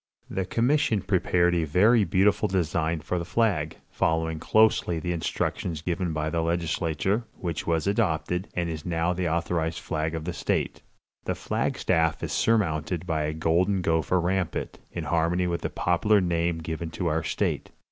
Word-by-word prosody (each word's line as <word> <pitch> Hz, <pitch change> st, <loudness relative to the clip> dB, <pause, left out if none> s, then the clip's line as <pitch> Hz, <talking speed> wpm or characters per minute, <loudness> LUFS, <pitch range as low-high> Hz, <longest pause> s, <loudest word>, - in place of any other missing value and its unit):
'" -, -, -68 dB
The 95 Hz, -, -1 dB
commission 120 Hz, -1 st, +1 dB
prepared 90 Hz, -2 st, +2 dB
a 85 Hz, -2 st, +1 dB
very 105 Hz, +9 st, +4 dB
beautiful 100 Hz, +3 st, +3 dB
design 85 Hz, -4 st, 0 dB
for 90 Hz, +3 st, -2 dB
the -, -, -3 dB
flag, 90 Hz, -6 st, 0 dB
following 80 Hz, -1 st, 0 dB
closely 110 Hz, -3 st, +3 dB
the 90 Hz, +2 st, -3 dB
instructions 80 Hz, -1 st, -2 dB
given 90 Hz, 0 st, -1 dB
by 80 Hz, 0 st, -2 dB
the 85 Hz, 0 st, 0 dB
legislature, 85 Hz, +5 st, 0 dB
which 85 Hz, -3 st, -3 dB
was 80 Hz, -2 st, +1 dB
adopted, 90 Hz, -3 st, 0 dB
and 85 Hz, -1 st, 0 dB
is 80 Hz, -2 st, -5 dB
now 85 Hz, 0 st, 0 dB
the 90 Hz, -1 st, -1 dB
authorized 85 Hz, 0 st, -1 dB
flag 80 Hz, 0 st, -2 dB
of 80 Hz, -1 st, -4 dB
the 90 Hz, -, -3 dB
state. 70 Hz, -, -1 dB, 0.4 s
The -, -, -1 dB
flag -, -, -2 dB
staff 80 Hz, -1 st, +1 dB
is -, -, -3 dB
surmounted 90 Hz, -6 st, +1 dB
by 80 Hz, -3 st, 0 dB
a 75 Hz, -, -2 dB
golden 90 Hz, +4 st, +1 dB
gopher 80 Hz, +2 st, +2 dB
rampant, 90 Hz, 0 st, -2 dB
in -, -, -4 dB
harmony 85 Hz, +2 st, +1 dB
with 85 Hz, -1 st, -1 dB
the -, -, -2 dB
popular 100 Hz, +5 st, +2 dB
name 85 Hz, -2 st, 0 dB
given 80 Hz, +1 st, -4 dB
to 90 Hz, -, -2 dB
our 80 Hz, -1 st, +1 dB
state. -, -, -2 dB
85 Hz, 170 wpm, -26 LUFS, 80-95 Hz, 0.4 s, very